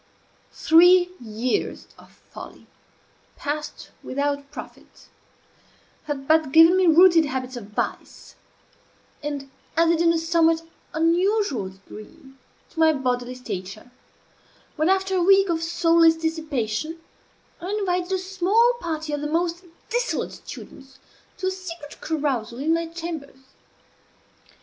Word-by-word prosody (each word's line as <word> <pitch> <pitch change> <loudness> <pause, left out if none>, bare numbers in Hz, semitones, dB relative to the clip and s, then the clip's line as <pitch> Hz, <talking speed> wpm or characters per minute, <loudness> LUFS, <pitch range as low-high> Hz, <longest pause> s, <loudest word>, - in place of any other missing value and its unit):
Three 355 +2 +5
years 230 +2 -3
of - - -18 0.2
folly, - - -11 0.7
passed 300 +1 -5
without 280 +1 -2
profit, 295 - -12 1.0
had 280 -2 -5
but 315 -3 +3
given 330 +4 +7
me 375 -1 +3
rooted 335 0 +6
habits 260 -2 -4
of 240 -4 -7
vice, 210 - -5 0.9
and 290 -2 -5 0.3
added, 335 0 +3
in 335 0 +4
a 335 - +1
somewhat 330 0 +2 0.3
unusual 335 - +1
degree, 215 +9 -14 0.4
to 325 - -9
my 320 -1 +5
bodily 250 -2 -2
stature, 215 -1 -7 0.8
when, 310 +2 +1
after 385 0 +1
a 365 - +2
week 390 +1 +5
of 330 -1 0
soulless 330 -1 +4
dissipation, 315 -3 -3 0.6
I 355 - -5
invited 360 -2 -1
a 380 - +2
small 390 +6 +2
party 315 -4 -4
of 290 - -2
the 295 - -2
most 340 +3 -1 0.3
dissolute - - -1
students 270 0 -12 0.4
to 370 - -5
a 375 - +1
secret 345 -5 -9
carousal 265 -7 -2
in 305 +5 +1
my 335 0 -1
chambers. 325 -4 -7
320 Hz, 120 wpm, -23 LUFS, 275-345 Hz, 1.0 s, given